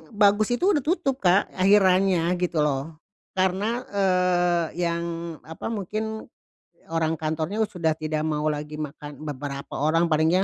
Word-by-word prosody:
bagus 205 Hz, +3 st, +4 dB
itu 375 Hz, +9 st, +2 dB
udah 295 Hz, -8 st, +1 dB
tutup, 295 Hz, -4 st, 0 dB
Kak, 185 Hz, +2 st, +3 dB
akhirannya 185 Hz, -2 st, +4 dB
gitu 175 Hz, -4 st, +1 dB
loh. 150 Hz, +2 st, -1 dB, 0.4 s
Karena, 195 Hz, +6 st, 0 dB
eee, 180 Hz, -3 st, +2 dB, 0.2 s
yang 170 Hz, 0 st, -1 dB, 0.4 s
apa, 160 Hz, +6 st, -7 dB
mungkin 220 Hz, +1 st, -3 dB, 0.7 s
orang 165 Hz, -1 st, +1 dB
kantornya 160 Hz, +7 st, -2 dB
sudah 160 Hz, -3 st, -1 dB
tidak 155 Hz, 0 st, -2 dB
mau 150 Hz, -1 st, -1 dB
lagi 150 Hz, 0 st, -5 dB
makan 145 Hz, 0 st, -7 dB
beberapa 140 Hz, -1 st, -6 dB
orang 165 Hz, +3 st, +2 dB
paling 160 Hz, +5 st, +3 dB
175 Hz, 130 wpm, -25 LUFS, 155-200 Hz, 0.7 s, bagus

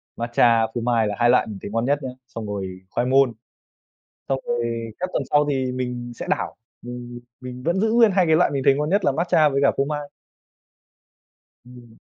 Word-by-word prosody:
matcha, 115 Hz, -1 st, +3 dB
phô 120 Hz, -, -3 dB
mai 115 Hz, -2 st, +1 dB
là 105 Hz, -, -3 dB
hai 120 Hz, 0 st, +3 dB
loại 125 Hz, -, +4 dB
mình 105 Hz, -3 st, -7 dB
thấy 100 Hz, -, -7 dB
ngon 115 Hz, +2 st, 0 dB
nhất 145 Hz, +1 st, +1 dB
nhá, 130 Hz, -, -3 dB, 0.2 s
xong 115 Hz, -4 st, -7 dB
rồi 95 Hz, -2 st, -5 dB
khoai 120 Hz, -, -1 dB
môn. 135 Hz, -2 st, +4 dB, 1.0 s
Xong 135 Hz, -, 0 dB
rồi 115 Hz, -1 st, -2 dB
các 185 Hz, 0 st, -2 dB
tuần -, -, 0 dB
sau 145 Hz, 0 st, +4 dB
thì 130 Hz, -2 st, -1 dB
mình 125 Hz, -1 st, -4 dB
sẽ -, -, -7 dB
đảo, -, -, -1 dB, 0.3 s
mình 120 Hz, 0 st, -8 dB, 0.2 s
mình 125 Hz, 0 st, -8 dB
vẫn 175 Hz, +5 st, 0 dB
giữ 220 Hz, 0 st, +1 dB
nguyên 230 Hz, -2 st, +5 dB
hai 185 Hz, -2 st, +2 dB
cái 160 Hz, -1 st, +4 dB
loại 175 Hz, -, +3 dB
mình 140 Hz, -2 st, -2 dB
thấy 135 Hz, -, +5 dB
ngon 150 Hz, +1 st, -1 dB
nhất 200 Hz, +5 st, +1 dB
là 140 Hz, -, +3 dB
matcha 160 Hz, 0 st, +3 dB
với 140 Hz, -1 st, 0 dB
cả 140 Hz, -, +4 dB
phô 135 Hz, -, +2 dB
mai. 145 Hz, 0 st, -4 dB, 1.6 s
Ừm. 120 Hz, -2 st, -15 dB
125 Hz, 215 wpm, -22 LUFS, 120-145 Hz, 1.6 s, nguyên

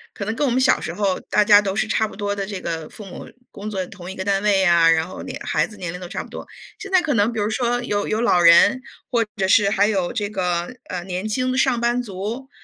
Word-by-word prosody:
可 200 Hz, -, -5 dB
能 220 Hz, +2 st, -3 dB
跟 290 Hz, +4 st, 0 dB
我 -, -, 0 dB
们 250 Hz, -, +1 dB
小 260 Hz, -, +3 dB
时 -, -, -4 dB
候 195 Hz, -2 st, 0 dB
大 210 Hz, -, +4 dB
家 205 Hz, 0 st, +7 dB
都 195 Hz, -2 st, -3 dB
是 215 Hz, -, 0 dB
差 220 Hz, 0 st, +1 dB
不 -, -, -12 dB
多 205 Hz, 0 st, -2 dB
的 200 Hz, -, -3 dB
这 200 Hz, -2 st, -5 dB
个 160 Hz, -3 st, -5 dB
父 210 Hz, -, -11 dB
母 190 Hz, -, -10 dB, 0.2 s
工 205 Hz, +2 st, -7 dB
作 190 Hz, -3 st, -3 dB
同 180 Hz, -1 st, -11 dB
一 -, -, -9 dB
个 190 Hz, -, -5 dB
单 195 Hz, -1 st, +1 dB
位 205 Hz, -2 st, +3 dB
呀， 170 Hz, -3 st, +5 dB
然 165 Hz, 0 st, +2 dB
后 185 Hz, -, -9 dB
年 -, -, -7 dB
孩 -, -, +1 dB
子 215 Hz, -, -14 dB
年 180 Hz, -3 st, -5 dB
龄 180 Hz, -, -8 dB
都 180 Hz, -, -7 dB
差 -, -, -4 dB
不 -, -, -15 dB
多。 -, -, -9 dB, 0.3 s
现 405 Hz, -2 st, -8 dB
在 370 Hz, -2 st, +4 dB
可 305 Hz, -3 st, 0 dB
能 215 Hz, 0 st, +2 dB
比 225 Hz, -, -4 dB
如 205 Hz, -, 0 dB
说 245 Hz, +1 st, -1 dB
有 205 Hz, -3 st, -2 dB
有 220 Hz, -, -1 dB
老 185 Hz, -7 st, +3 dB
人 170 Hz, +9 st, +6 dB, 0.3 s
或 235 Hz, -2 st, +2 dB
者 190 Hz, -, 0 dB
是 200 Hz, +1 st, +4 dB
还 205 Hz, 0 st, +2 dB
有 195 Hz, -5 st, 0 dB
这 205 Hz, -, -2 dB
个， 180 Hz, 0 st, -2 dB
呃， 180 Hz, -1 st, -4 dB
年 185 Hz, +2 st, -4 dB
轻 255 Hz, +4 st, -1 dB
的 255 Hz, -, -2 dB
上 260 Hz, -2 st, +2 dB
班 240 Hz, +1 st, +1 dB
族， 225 Hz, +5 st, -6 dB
205 Hz, 305 characters per minute, -21 LUFS, 185-230 Hz, 0.3 s, 家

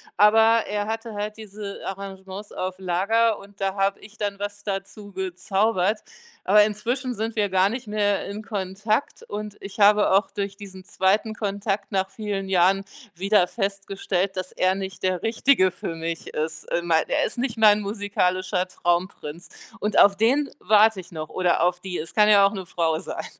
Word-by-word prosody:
aber 225 Hz, +2 st, +5 dB
er 205 Hz, 0 st, -2 dB
hatte 225 Hz, +1 st, -4 dB
halt 210 Hz, +1 st, -4 dB
diese 205 Hz, -2 st, -8 dB
Arrangements 195 Hz, +1 st, -7 dB
auf 185 Hz, 0 st, -3 dB
Lager 200 Hz, +5 st, +1 dB
und 200 Hz, 0 st, -16 dB
da 195 Hz, -1 st, -1 dB
habe 195 Hz, 0 st, 0 dB
ich 215 Hz, +1 st, -15 dB
dann 205 Hz, -1 st, -2 dB
was 205 Hz, 0 st, -5 dB
dazugezaubert. 195 Hz, +1 st, -1 dB, 0.4 s
Aber 210 Hz, +2 st, +6 dB
inzwischen 245 Hz, +5 st, -2 dB
sind 225 Hz, +1 st, -3 dB
wir 205 Hz, -1 st, +2 dB
gar 190 Hz, +1 st, +3 dB
nicht 240 Hz, +2 st, -5 dB
mehr 205 Hz, -1 st, 0 dB
in 210 Hz, +2 st, -6 dB
Kontakt 210 Hz, +3 st, -2 dB
und 210 Hz, 0 st, -6 dB
ich 195 Hz, +2 st, -9 dB
habe 210 Hz, 0 st, +5 dB
auch 195 Hz, +2 st, +3 dB
durch 200 Hz, -1 st, -4 dB
diesen 190 Hz, -2 st, -10 dB
zweiten 195 Hz, +3 st, +1 dB
Kontakt 200 Hz, -1 st, -3 dB
nach 190 Hz, 0 st, 0 dB
vielen 200 Hz, -2 st, -4 dB
Jahren 190 Hz, +1 st, +3 dB, 0.3 s
wieder 195 Hz, +1 st, +3 dB
festgestellt, 195 Hz, 0 st, -2 dB
dass 185 Hz, 0 st, -4 dB
er 185 Hz, +1 st, +1 dB
nicht 190 Hz, -1 st, -6 dB
der 185 Hz, -2 st, 0 dB
Richtige 225 Hz, -3 st, +3 dB
für 165 Hz, -, -6 dB
mich 165 Hz, 0 st, -5 dB
ist, 155 Hz, 0 st, -4 dB
in 170 Hz, -, 0 dB
mein 160 Hz, -1 st, +2 dB
äh, -, -, -3 dB
er -, -, +2 dB
ist -, -, -6 dB
nicht 245 Hz, -2 st, -2 dB
mein 210 Hz, -1 st, +6 dB
musikalischer 185 Hz, -3 st, -1 dB
Traumprinz 175 Hz, -2 st, -2 dB, 0.3 s
und 210 Hz, -1 st, -1 dB
auf 200 Hz, -1 st, +6 dB
den 265 Hz, +7 st, +2 dB
warte 215 Hz, +1 st, +4 dB
ich 180 Hz, -1 st, -11 dB
noch, 155 Hz, -1 st, -6 dB
oder 180 Hz, -2 st, +1 dB
auf 175 Hz, 0 st, +1 dB
die, 180 Hz, -1 st, -5 dB
es 160 Hz, -, -6 dB
kann 210 Hz, -1 st, +5 dB
ja 200 Hz, -2 st, +7 dB
auch 200 Hz, -, +2 dB
'ne 190 Hz, -3 st, -5 dB
Frau 165 Hz, -2 st, 0 dB
sein. 185 Hz, -, -6 dB
200 Hz, 180 wpm, -24 LUFS, 185-210 Hz, 0.4 s, ja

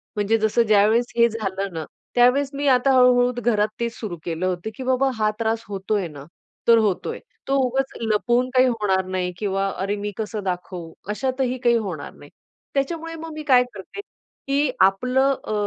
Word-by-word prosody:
म्हणजे 210 Hz, +2 st, +2 dB
जसं 220 Hz, +2 st, +2 dB
ज्यावेळेस 215 Hz, +3 st, +3 dB
हे 235 Hz, 0 st, +6 dB
झालं 195 Hz, -3 st, -4 dB
ना, 160 Hz, -1 st, -4 dB, 0.3 s
त्यावेळेस 250 Hz, +3 st, +4 dB
मी 285 Hz, +1 st, -2 dB
आता 260 Hz, 0 st, +4 dB
हळू-हळू 250 Hz, -1 st, +5 dB
घरात 215 Hz, -3 st, +2 dB
तेच 235 Hz, 0 st, -2 dB
सुरू 200 Hz, -6 st, -5 dB
केलं 170 Hz, +1 st, -2 dB
होतं, 185 Hz, +3 st, -2 dB
की 260 Hz, -, -6 dB
बाबा 260 Hz, +1 st, +2 dB
हा 215 Hz, -1 st, +2 dB
त्रास 225 Hz, 0 st, -1 dB
होतोय 195 Hz, -1 st, -2 dB
ना, 145 Hz, -3 st, -11 dB, 0.4 s
तर 230 Hz, 0 st, +7 dB
होतोय. 220 Hz, -, 0 dB, 0.3 s
तो 275 Hz, -, +1 dB
उगाच 265 Hz, +2 st, -1 dB
लपवून 240 Hz, +3 st, +1 dB
काही 255 Hz, 0 st, +6 dB
होणार 205 Hz, -6 st, 0 dB
नाही 185 Hz, -1 st, -2 dB
किंवा 195 Hz, -1 st, -1 dB
अरे 200 Hz, +2 st, -1 dB
मी 205 Hz, 0 st, -4 dB
कसं 215 Hz, -1 st, -4 dB
दाखवू, 180 Hz, -2 st, -5 dB, 0.2 s
अशातही 255 Hz, +3 st, -1 dB
काही 240 Hz, -1 st, +4 dB
होणार 180 Hz, -10 st, -5 dB
नाही. 145 Hz, -, -15 dB, 0.4 s
त्याच्यामुळे 330 Hz, +4 st, -2 dB
मग 325 Hz, 0 st, -8 dB
मी 305 Hz, 0 st, -6 dB
काय 255 Hz, -4 st, +5 dB
करते, 200 Hz, -, -10 dB, 0.5 s
की 280 Hz, 0 st, +1 dB
आपलं 250 Hz, +8 st, +3 dB
अ, -, -, -4 dB
225 Hz, 175 wpm, -23 LUFS, 195-255 Hz, 0.5 s, तर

